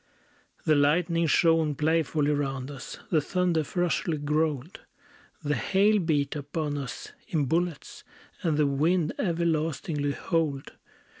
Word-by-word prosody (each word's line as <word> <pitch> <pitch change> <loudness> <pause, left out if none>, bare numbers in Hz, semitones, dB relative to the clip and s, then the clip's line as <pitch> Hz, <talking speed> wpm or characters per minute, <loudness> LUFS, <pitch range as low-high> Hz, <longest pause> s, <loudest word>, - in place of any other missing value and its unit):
The 155 - +4
lightning 165 +3 +2
shone 165 -2 +3
playfully 155 -1 +1
round 135 -2 -2
us; 135 -5 -8
The 160 -3 +4
thunder 175 0 +1
ferociously 170 -1 -1
growled; 150 +1 -1 0.6
The 150 0 0
hail 200 - +3
beat 150 -5 0
upon 145 +1 -3
us 140 -3 -6 0.2
in 155 -4 0
bullets; 165 +2 -2 0.4
And 160 -3 0
the 150 - +3
wind 155 +4 +1
everlastingly 160 -4 0
howled. 155 -6 -1
155 Hz, 120 wpm, -27 LUFS, 145-165 Hz, 0.6 s, The